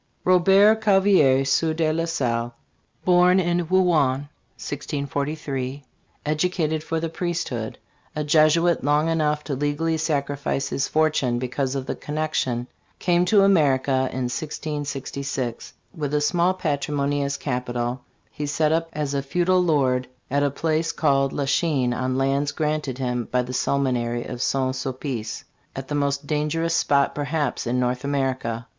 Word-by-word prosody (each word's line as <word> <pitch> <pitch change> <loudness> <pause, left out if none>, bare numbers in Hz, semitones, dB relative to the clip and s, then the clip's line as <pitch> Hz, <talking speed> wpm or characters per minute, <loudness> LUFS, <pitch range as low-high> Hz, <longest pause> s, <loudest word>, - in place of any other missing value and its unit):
ROBERT 195 +4 +5
CAVALIER, 190 -10 +4
Sieur 155 +4 +1
de 155 -1 +1
la 165 +1 0
Salle, 120 -7 -1 0.5
born 180 +1 +5
in 175 -1 0
Rouen, 155 -7 +2 0.3
1643; 140 -1 -4 0.4
educated 155 0 0
for 165 +1 -2
the 165 - -2
priesthood; 165 -9 -3 0.4
a 150 - -1
Jesuit 155 +2 +3
long 150 +3 +2
enough 150 -2 0
to 145 - -4
legally 145 +4 0
sacrifice 140 -3 -1
his 135 - -1
fortune 155 -6 +1
because 130 +2 -2
of 135 -1 -3
the - - -2
connection 150 -5 -2 0.3
came 175 0 +2
to 200 +2 +5
America 145 -9 +3 0.2
in 130 - -3
1666. 140 -2 -4 0.2
With 150 -3 -2
a 150 - +2
small 175 +5 +2
patrimony 145 -3 -1
as 140 0 -2
capital 125 -1 -3 0.3
he 145 - -4
set 150 +1 +1
up 165 +1 0
as 150 -2 -2
a 140 - 0
feudal 180 +6 +2
lord 130 -7 +1 0.2
at 140 +1 +2
a 145 - +2
place 160 +3 -1
called 135 -3 +2
La 140 - -2
Chine, 135 -4 +1
on 130 +1 -1
lands 135 +2 +1
granted 150 -3 -2
him 125 -2 -2
by 125 - +2
e. - - -3
the 125 +1 -7
Seminary 125 -3 0
of 120 - -6
St. 130 -1 0
Sulpice, 130 -4 -4 0.3
at 135 0 -6
the - - -3
most 140 0 0
dangerous 155 +3 -1
spot, 140 -3 +2
perhaps, 145 -2 -2
in 125 +1 0
North 125 0 -1
America. 130 -4 -2
145 Hz, 150 wpm, -23 LUFS, 130-160 Hz, 0.5 s, ROBERT